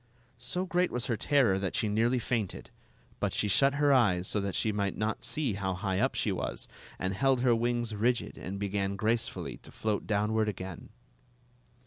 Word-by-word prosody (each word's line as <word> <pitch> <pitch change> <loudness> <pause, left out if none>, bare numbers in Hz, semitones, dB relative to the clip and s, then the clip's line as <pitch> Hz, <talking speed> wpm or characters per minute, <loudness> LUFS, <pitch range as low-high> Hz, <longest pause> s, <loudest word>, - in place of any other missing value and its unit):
So 180 +1 -1
great 180 0 +1
was 125 -1 -2
her 120 - 0
terror 120 -6 +3
that 95 -1 -2
she 110 - +1
nearly 115 +4 +2
fainted; 115 -4 -2 0.5
but - - 0
she 105 - 0
shut 135 +7 +3
her 145 -1 +4
eyes 95 -8 +3
so 105 - 0
that 100 -1 -3
she 110 - +1
might 100 -2 -1
not 110 +1 -2
see 145 -8 -1
how 95 -2 -2
high 95 0 -1
up 130 +4 +1
she 105 - +1
was, 95 - -3 0.3
and 95 +1 -2
held 130 +4 +2
her 125 -1 +4
wings 120 0 0
rigid 120 +4 0
and 95 +3 -6
began 100 0 -1
gracefully 110 +3 -1
to - - -15
float 110 -2 -2
downward 105 +1 +1
again. 95 -3 -7
110 Hz, 185 wpm, -30 LUFS, 100-125 Hz, 0.5 s, her